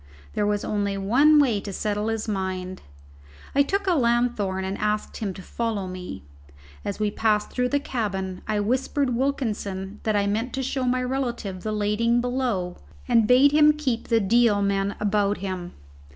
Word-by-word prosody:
There 205 - 0
was 205 0 0
only 200 -1 -1
one 260 +11 +4
way 245 -8 +3
to 200 - -6
settle 210 +2 -2
his 225 0 -2
mind; 185 -2 -3 0.7
I 280 - +4
took 395 +8 0
a 370 - +3
lanthorn, 235 - +1
and 190 +1 -3
asked 210 0 -1
him 210 -3 -2
to 190 - -9
follow 225 -3 -2
me. 180 - -7 0.6
As 200 - -4
we 210 -1 +1
passed 210 -1 +1
through 250 0 0
the 285 - +2
cabin 195 -8 -3
I 215 -1 0
whispered 255 +3 0
Wilkinson 210 -7 -2
that 215 -1 0
I 200 -1 +2
meant 220 +5 -1
to 265 - -2
show 260 0 -1
my 255 0 +1
relative 245 -8 -3
the 215 - -3
lading 215 +3 +1
below, 240 -8 -1 0.3
and 225 -2 +4
bade 260 +4 +6
him 300 0 +6
keep 265 -6 -2
the 230 - +3
Deal 220 +1 +3
men 200 0 0
about 205 -1 +1
him. 185 -2 -5
215 Hz, 175 wpm, -25 LUFS, 200-250 Hz, 0.7 s, bade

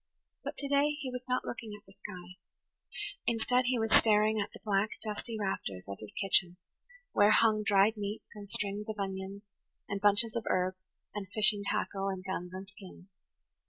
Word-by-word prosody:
But - - -4
today 285 +1 +2
he 265 -4 -4
was 250 0 -5
not 255 0 +1
looking 220 -3 -5
at - - -33
the 195 - -18
sky; 185 -2 -10 0.9
instead, 245 +2 +2
he 250 0 +2
was 225 -1 0
staring 215 0 +5
at 200 - -4
the - - -12
black, 205 0 +2
dusty 220 +1 -3
rafters 100 - -3
of 100 - -6
his 110 - -9
kitchen, 180 -2 +2 0.5
where 205 0 +5
hung 215 0 +5
dried 205 +1 +4
meats 205 +1 -4
and 205 -1 -10
strings 205 +2 -1
of 215 - -4
onions 195 0 -4 0.4
and 200 0 -3
bunches 205 +2 +3
of 230 - -2
herbs 185 0 0 0.3
and 205 -2 -4
fishing 210 -1 +6
tackle 195 0 -1
and 190 -1 -3
guns 180 -2 -3
and 190 +1 -7
skins. 195 -1 -13
205 Hz, 175 wpm, -32 LUFS, 195-220 Hz, 0.9 s, fishing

